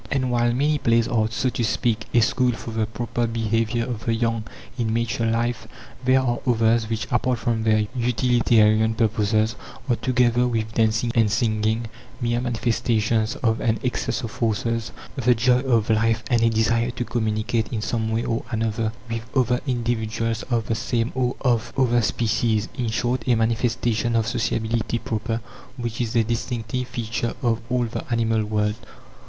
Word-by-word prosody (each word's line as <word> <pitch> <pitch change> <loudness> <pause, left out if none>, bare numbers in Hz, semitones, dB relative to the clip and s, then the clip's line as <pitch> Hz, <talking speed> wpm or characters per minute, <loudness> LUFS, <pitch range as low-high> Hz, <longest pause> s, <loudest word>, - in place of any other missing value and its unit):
And 130 -2 0
while 120 0 +2
many 145 +4 +1
plays 115 -2 +3
are, 110 -2 +1
so 125 +3 0
to 120 - -2
speak, 110 -1 0
a 120 - +4
school 125 +2 +2
for 115 - -7
the 110 -1 -1
proper 120 +1 -2
behaviour 115 +1 0
of 120 -3 -5
the 115 - +2
young 115 -1 -1 0.3
in 115 -3 -1
mature 115 +1 0
life, 115 0 -1 0.4
there 130 +1 +4
are 120 -2 0
others, 115 -1 +2
which, 110 -1 -2
apart 125 0 +1
from 115 0 -1
their 110 -1 +3
utilitarian 115 -3 +3
purposes, 110 0 +1 0.3
are, 120 - +2
together 125 -1 +2
with 110 -2 -2
dancing 110 +1 +1
and 115 -3 +3
singing, 110 0 +1 0.3
mere 120 -1 0
manifestations 115 -1 0
of 110 -2 +1
an 110 -1 +1
excess 125 +1 -1
of 115 - -4
forces 115 0 -1 0.2
"the 125 -3 +3
joy 125 +2 +3
of 120 -5 +1
life," 115 0 +2
and 120 -1 +3
a 115 - +4
desire 115 +1 +1
to 120 0 -4
communicate 110 0 -1
in 110 -3 -2
some 110 0 -1
way 110 +1 0
or 115 0 -1
another 110 -1 -1
with 115 0 -3 0.2
other 125 -1 +2
individuals 115 -2 -1
of 115 -3 0
the - - -1
same 115 +1 -1
or 125 -1 0
of 120 -5 +1
other 120 -2 +3
species 110 -1 0
in 120 -3 -1
short, 120 +2 0
a 125 - +4
manifestation 115 +1 0
of 115 -1 +2
sociability 115 0 -1
proper, 115 0 -3 0.4
which 120 -1 -3
is 115 -1 -2
a 115 - +4
distinctive 120 +1 -3
feature 115 -1 -3
of 115 -1 +1
all 125 -1 +1
the 115 0 -4
animal 115 -1 +1
world. 105 0 0
115 Hz, 170 wpm, -23 LUFS, 110-120 Hz, 0.4 s, a